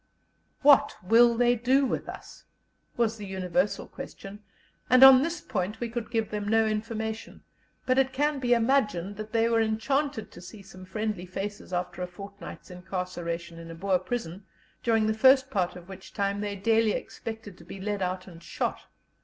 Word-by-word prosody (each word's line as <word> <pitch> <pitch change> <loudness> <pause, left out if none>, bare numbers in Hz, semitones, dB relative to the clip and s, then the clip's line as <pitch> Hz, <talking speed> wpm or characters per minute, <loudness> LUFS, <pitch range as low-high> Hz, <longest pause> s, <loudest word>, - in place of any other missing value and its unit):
"What 285 -1 +6
will 235 +4 +5
they 245 0 +4
do 255 +4 +2
with - - -3
us?" - - -11 0.5
was 225 -2 +1
the 210 - -7
universal 185 0 -1
question, 195 +1 -9 0.5
and 255 +1 +7
on 265 -1 +10
this 335 +2 -2
point 210 -2 -3
we 240 - -3
could 230 -1 -5
give 225 -2 -1
them 210 -1 -3
no 225 +1 +3
information; 220 0 -4 0.4
but 255 +1 +3
it 265 0 +2
can 290 +2 0
be 245 -2 +3
imagined 210 -6 +1
they 225 +2 0
were 230 -1 +2
enchanted 225 +3 -1
to 175 - -12
see 190 +3 -11
some 185 -1 -12
friendly 210 -2 -3
faces 195 +2 -6
after 180 0 -3
a 180 - -2
fortnight's 200 +1 -10
incarceration 175 -2 -5
in 165 0 -10
a 165 - -8
Boer 185 +2 +1
prison, 190 -2 -5 0.3
during 225 -2 +2
the 220 - +1
first 260 +4 +5
part 180 -4 0
of 180 -1 -11
which 190 -1 -12
time 200 -1 -1
they 205 -1 -3
daily 220 +2 +2
expected 220 -4 -7
to - - -13
be 180 +3 -10
led 205 0 -3
out 185 0 -2
and 170 -3 -13
shot. - - -3
210 Hz, 180 wpm, -27 LUFS, 185-235 Hz, 0.5 s, on